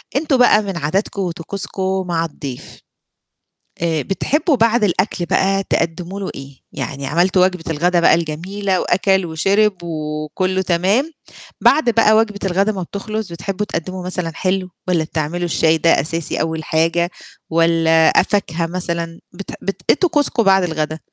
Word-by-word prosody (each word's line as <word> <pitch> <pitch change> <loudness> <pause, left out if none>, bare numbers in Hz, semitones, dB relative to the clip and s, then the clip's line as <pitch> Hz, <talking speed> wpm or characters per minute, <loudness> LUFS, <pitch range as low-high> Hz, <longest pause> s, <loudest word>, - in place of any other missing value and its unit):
أنتم 280 -1 +2
بقى 245 -4 +5
من 195 -4 -4
عاداتكم 190 +6 -1
وطقوسكم 190 +2 -3
مع 165 -1 0
الضيف، 140 -5 -8 1.0
آآ، 165 -2 0
بتحبّوا 290 - 0
بعد 230 -1 +2
الأكل 185 -2 0
بقى 195 +2 +1
تقدّموا 175 +4 -1
له 195 - -4
إيه؟ 135 0 -10
يعني 135 +1 -5
عملتوا 180 +5 +3
وجبة 185 -3 -2
الغدا 175 +3 +2
بقى 170 - +5
الجميلة 180 +4 -2
وأَكَل 190 -1 +2
وشِرِب 195 +6 +2
وكُلّه 155 +3 -2
تمام، 190 - +1 0.5
بعد 285 -3 +4
بقى 225 -2 +4
وجبة 215 -2 +1
الغدا 195 +3 +1
ما 190 -3 -4
بتخلص، 215 +2 -5
بتحبوا 195 +4 -3
تقدِّموا 185 -1 -5
مثلًا 180 -2 -3
حلو؟ 185 0 -1 0.2
والَّا 175 -3 +2
بتعملوا 160 +2 -3
الشاي 165 -1 +2
ده 165 -3 +3
أساسي 165 +2 -3
أول 160 -1 -2
حاجة 165 +3 +1 0.4
والَّا 165 -1 +4
فاكهة 170 -5 -1
مثلًا 170 -1 -4
بت 195 +2 -8
بت 195 -2 -4
إيه - - +7
طقوسكم 295 -8 +1
بعد 195 -2 +4
الغدا؟ 155 -2 -2
180 Hz, 145 wpm, -18 LUFS, 165-195 Hz, 1.0 s, إيه